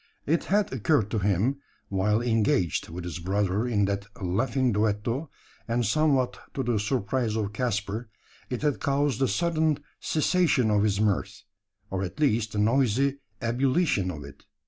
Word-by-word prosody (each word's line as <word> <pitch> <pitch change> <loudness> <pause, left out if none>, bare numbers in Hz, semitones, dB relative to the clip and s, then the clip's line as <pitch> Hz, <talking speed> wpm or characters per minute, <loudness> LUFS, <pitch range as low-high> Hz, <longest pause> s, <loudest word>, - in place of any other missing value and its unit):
It 160 +3 +1
had 205 -4 +1
occurred 120 -3 +1
to 110 - 0
him 100 +7 +1 0.3
while 105 +4 +1
engaged 110 -7 +1
with 85 +2 -6
his 90 0 -5
brother 100 +4 0
in 105 -4 +2
that 100 0 -2
laughing 115 +7 0
duetto 110 +7 0 0.4
and 120 0 0
somewhat 135 +1 +2 0.2
to 135 - -1
the 120 -3 +1
surprise 110 +1 -1
of 105 -2 -2
Caspar, 110 -1 -2 0.4
it 125 +1 -3
had 145 -3 +1
caused 140 -2 0
a 135 - +4
sudden 160 -2 +1 0.2
cessation 155 -7 +2
of 105 -1 +3
his 100 -1 +1
mirth, 105 0 0 0.5
or 95 -1 -1
at 95 +4 -5
least 115 -7 +1
the - - -3
noisy 130 +4 +2 0.2
ebullition 130 - +1
of 75 -5 -6
it. 70 - -13
115 Hz, 155 wpm, -27 LUFS, 100-135 Hz, 0.5 s, a